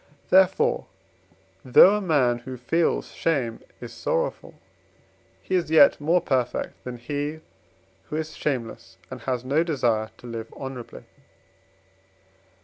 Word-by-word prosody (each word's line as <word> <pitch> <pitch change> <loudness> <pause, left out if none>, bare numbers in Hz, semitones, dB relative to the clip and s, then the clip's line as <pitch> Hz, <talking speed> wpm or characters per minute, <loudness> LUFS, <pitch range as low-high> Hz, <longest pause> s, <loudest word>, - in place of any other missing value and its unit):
Therefore, 190 0 +3 0.8
though 180 +10 +7
a - - -3
man 135 -10 +2
who 130 +1 -8
feels 160 +8 0
shame 130 -9 -1 0.2
is - - -9
sorrowful, - - -3 0.9
he - - -5
is 180 -4 +1
yet 155 -2 +6
more 165 +5 +3
perfect 125 -6 -2
than 125 -1 -6
he, 145 +5 -4 0.7
who - - -4
is 155 0 -4
shameless, 115 -9 -4
and 130 - -7
has 125 -1 -3
no 145 +5 +2
desire 120 -9 0
to - - -16
live 115 -1 -7
honourably. 130 -3 -8
135 Hz, 125 wpm, -24 LUFS, 120-160 Hz, 0.9 s, though